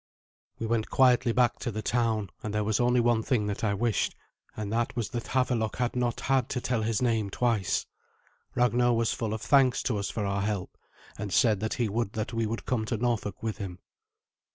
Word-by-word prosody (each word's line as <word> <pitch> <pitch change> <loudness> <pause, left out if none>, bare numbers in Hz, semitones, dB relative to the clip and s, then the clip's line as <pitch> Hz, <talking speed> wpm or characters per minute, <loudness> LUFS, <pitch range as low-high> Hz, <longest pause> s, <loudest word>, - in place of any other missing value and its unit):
We 115 - -4
went 110 -1 0
quietly 125 -2 +4
back 120 0 +2
to - - -3
the 110 -1 -4
town, 110 -5 0
and 105 0 -4
there 105 - +1
was 105 0 0
only 125 0 +3
one 120 -1 +3
thing 110 -2 0
that 105 +1 -3
I 100 -2 +1
wished, 115 0 0 0.4
and 105 0 -3
that 120 +1 0
was 120 -3 -2
that 120 -1 -4
Havelok 125 -4 0
had 125 -1 -1
not 120 -1 -1
had 135 -2 +1
to 125 - -1
tell 125 -2 -1
his 110 +2 0
name 110 -4 +1
twice. 110 -3 0 0.7
Ragnar 120 0 +3
was 115 0 +1
full 115 -3 -3
of 110 0 -4
thanks 135 -3 +4
to 110 -5 0
us 100 - -2
for 105 - -2
our 100 0 -1
help, 100 -2 -2 0.4
and 100 -1 -4
said 110 +1 +3
that 110 +1 -2
he 120 -3 0
would 105 0 -2
that 110 +2 -3
we 115 -1 0
would 115 +2 -4
come 120 -4 0
to 115 - -2
Norfolk 110 -3 -2
with 110 -1 -3
him. 95 -4 -5
115 Hz, 215 wpm, -28 LUFS, 105-120 Hz, 0.7 s, quietly